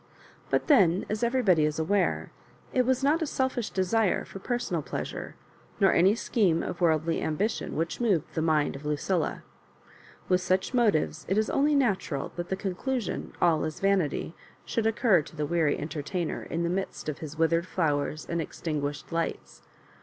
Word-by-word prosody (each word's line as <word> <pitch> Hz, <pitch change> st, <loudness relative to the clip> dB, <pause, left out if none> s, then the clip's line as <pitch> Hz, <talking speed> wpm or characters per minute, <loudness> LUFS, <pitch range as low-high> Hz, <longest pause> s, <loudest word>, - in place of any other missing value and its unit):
But -, -, +1 dB
then 195 Hz, -, +4 dB
as 215 Hz, 0 st, -2 dB
everybody 235 Hz, -10 st, +3 dB
is 150 Hz, 0 st, 0 dB
aware, 180 Hz, +4 st, 0 dB, 0.4 s
it 250 Hz, -1 st, +2 dB
was 260 Hz, 0 st, +1 dB
not 305 Hz, +4 st, +3 dB
a 320 Hz, -, 0 dB
selfish 260 Hz, -5 st, -1 dB
desire 195 Hz, +1 st, +1 dB
for 195 Hz, -, -9 dB
personal 245 Hz, +5 st, -2 dB
pleasure, -, -, -5 dB, 0.4 s
nor 195 Hz, -3 st, +5 dB
any 190 Hz, +5 st, +5 dB
scheme 190 Hz, -9 st, +1 dB
of 180 Hz, -, -5 dB
worldly 160 Hz, -1 st, +2 dB
ambition, 190 Hz, +8 st, -1 dB
which 165 Hz, +8 st, -2 dB
moved 200 Hz, -9 st, +1 dB
the 160 Hz, -, -1 dB
mind 155 Hz, -3 st, +2 dB
of 140 Hz, -, -9 dB
Lucilla. 150 Hz, +3 st, -1 dB, 0.8 s
With 180 Hz, -1 st, +3 dB
such 185 Hz, +5 st, 0 dB
motives 200 Hz, -10 st, +2 dB
it 195 Hz, -, +1 dB
is 215 Hz, 0 st, +1 dB
only 290 Hz, +2 st, +3 dB
natural 195 Hz, -, 0 dB
that 175 Hz, 0 st, -5 dB
the 190 Hz, -, 0 dB
conclusion, 200 Hz, +4 st, -3 dB
" -, -, -23 dB
All 165 Hz, -3 st, +3 dB
is 155 Hz, -1 st, -4 dB
vanity," 190 Hz, -5 st, +1 dB, 0.3 s
should 225 Hz, -1 st, 0 dB
occur 220 Hz, -5 st, +3 dB
to 150 Hz, -, -13 dB
the 150 Hz, -1 st, -1 dB
weary 160 Hz, -2 st, +1 dB
en 150 Hz, -, -5 dB
tertainer 165 Hz, +3 st, -3 dB
in 170 Hz, +1 st, -1 dB
the 170 Hz, -, 0 dB
midst 190 Hz, -2 st, -3 dB
of 150 Hz, -, -3 dB
his 155 Hz, -1 st, -7 dB
withered 165 Hz, +2 st, +2 dB
flowers 155 Hz, -3 st, -1 dB
and 170 Hz, -1 st, -1 dB
extinguished 150 Hz, -2 st, -4 dB
lights. 165 Hz, 0 st, -3 dB
180 Hz, 175 wpm, -28 LUFS, 160-215 Hz, 0.8 s, nor